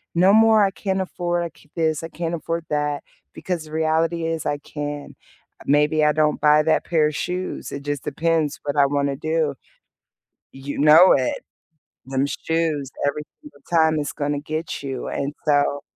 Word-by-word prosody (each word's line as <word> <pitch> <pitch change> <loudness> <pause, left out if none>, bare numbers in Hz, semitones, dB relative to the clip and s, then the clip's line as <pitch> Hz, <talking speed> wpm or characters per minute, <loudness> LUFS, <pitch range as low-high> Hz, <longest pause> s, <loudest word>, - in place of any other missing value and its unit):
no 185 +3 +5
more, 220 -1 +6
"I 195 - 0
can't 190 -1 -2
afford 175 -2 -2 0.2
this, 160 -2 0
I - - -4
can't 170 +1 -3
afford 165 0 -4
that," 150 -1 -1 0.3
because 175 -4 -4
the 155 - -14
reality 160 +1 0
is 165 -1 -3
I 145 - 0
can. 145 0 -6 0.5
Maybe 150 +2 +3
I 150 - +5
don't 155 0 +1
buy 150 0 +5
that 160 0 +1
pair 155 -3 +2
of 150 - -4
shoes. 180 +3 -4
It 140 - -5
just 145 -1 -3
depends 155 0 0
what 145 0 -3
I 140 - +6
wanna 140 -1 0
do. 155 -2 -1 1.0
You 135 +1 -7
know 155 +5 +7
it. 130 -2 0 0.6
Them 135 +1 0
shoes 155 -3 -2 0.2
every 150 +1 -3 0.2
single 295 - -15
time 160 -2 +3
is 145 - -3
gonna 145 0 -2
get 155 0 -5
you. 135 -2 -4
And 140 +2 -3
so, 145 -1 +2
155 Hz, 170 wpm, -22 LUFS, 145-165 Hz, 1.0 s, know